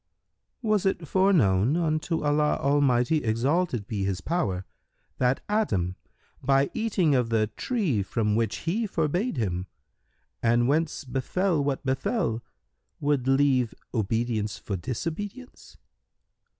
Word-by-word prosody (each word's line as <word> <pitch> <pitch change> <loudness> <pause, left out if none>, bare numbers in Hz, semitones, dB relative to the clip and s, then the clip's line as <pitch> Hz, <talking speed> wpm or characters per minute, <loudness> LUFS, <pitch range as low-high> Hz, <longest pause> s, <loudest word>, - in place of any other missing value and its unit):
Q 225 - -3
"Was 205 -2 +3
it 175 -4 -1
foreknown 145 - +3
unto 160 0 0
Allah 150 0 +2
Almighty 140 0 +3
(exalted 120 - 0
be 100 -2 -3
His 95 -2 -1
power!) 95 - -1 0.5
that 125 +1 +1
Adam, 100 - 0 0.5
by 135 0 +2
eating 200 -9 +1
of 125 -3 +2
the 110 -2 +1
tree 190 - 0
from 105 +2 0
which 110 -3 -1
He 215 +6 0
forbade 175 - -1
him 90 -5 -2 0.7
and 120 +1 +3
whence 155 +2 0
befel 145 +6 0
what 140 -1 -2
befel, 130 - 0 0.6
would 145 -3 0
leave 135 -3 +3 0.2
obedience 110 -1 -1
for 100 - -4
disobedience?" 170 - -6
135 Hz, 120 wpm, -26 LUFS, 115-165 Hz, 0.7 s, Was